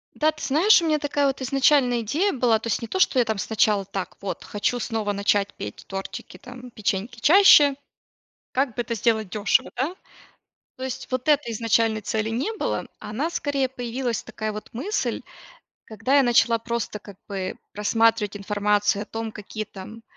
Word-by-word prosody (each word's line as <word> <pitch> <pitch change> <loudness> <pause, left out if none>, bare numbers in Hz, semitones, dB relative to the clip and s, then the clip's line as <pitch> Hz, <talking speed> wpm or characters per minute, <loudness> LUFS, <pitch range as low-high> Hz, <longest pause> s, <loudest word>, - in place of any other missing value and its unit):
Да, 310 +1 +2
ты 310 - -11
знаешь, 340 +8 +5
у - - -2
меня 310 -1 +3
такая 290 -1 +1
вот 270 0 -2
изначально 260 -2 +3
идея 310 - 0
была, 240 -4 +2
то 230 - -6
есть 230 - 0
не 230 - -5
то, 380 - -3
что 270 - +4
я 245 - +4
там 220 -1 -1
сначала: 205 0 +1
так, 195 -1 -5
вот, 195 - -5
хочу 210 +4 -1
снова 220 -3 -2
начать 200 0 +1
петь 105 - -8
тортики, 195 -1 -7
там, 250 +3 -11
печеньки 215 +2 -3
чаще, 295 - +7 0.8
как 260 -2 0
бы 240 - -1
это 235 0 -3
сделать 220 -2 +1
дёшево, 205 +1 +1
да? 300 +8 -2 0.8
То 260 - -6
есть 260 0 -5
вот 255 +2 -3
этой 290 -6 +3
изначальной 225 -1 +1
цели 215 +2 -1
не 260 - -1
было, 435 - -2
а - - -8
она, 280 +10 -2
скорее, 280 -5 -1
появилась 245 -2 -3
такая 215 0 -5
вот 210 0 -8
мысль, 360 - -2 0.6
когда 225 +6 0
я 280 - +6
начала 235 -2 +3
просто, 235 -2 -3
как 200 -1 -13
бы, 190 -2 -4 0.2
просматривать 210 0 +1
информацию 205 0 +1
о - - -9
том, 225 -1 -5
какие 215 +1 -6
там 215 +3 -11
230 Hz, 180 wpm, -24 LUFS, 210-265 Hz, 0.8 s, чаще